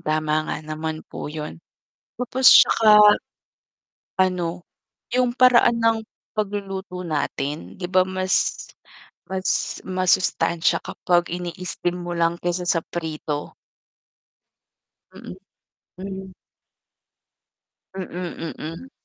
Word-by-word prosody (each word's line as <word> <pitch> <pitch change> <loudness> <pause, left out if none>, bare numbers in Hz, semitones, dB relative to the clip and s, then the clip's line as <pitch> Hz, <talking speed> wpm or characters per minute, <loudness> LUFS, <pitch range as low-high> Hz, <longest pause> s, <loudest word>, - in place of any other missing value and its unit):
Tama 155 -1 0
nga - - -2
naman 155 +1 -5
po - - -7
yun. 150 - -7 0.6
Tapos 255 +1 +5
tsaka 210 -1 +7 1.0
ano, 180 -2 0 0.5
yung 250 -1 +3
paraan 240 -1 +5
ng 225 0 +3 0.4
pagluluto 195 -3 -4
natin 145 - -3
'di - - -3
ba 185 +1 +4
mas 185 0 0 0.6
mas 190 0 -1
masustansya 185 -2 +1
kapag 175 -1 0
ini-steam 175 0 -3
mo 175 0 -5
lang 165 0 +2
kaysa 175 0 -2
sa 165 -2 +2
prito. 155 -3 -5 1.6
Mm, - - -10 0.6
hmm. 190 0 -7 1.6
Mm, 175 -3 -5
mm. 165 +12 -8
180 Hz, 90 wpm, -23 LUFS, 160-195 Hz, 1.6 s, tsaka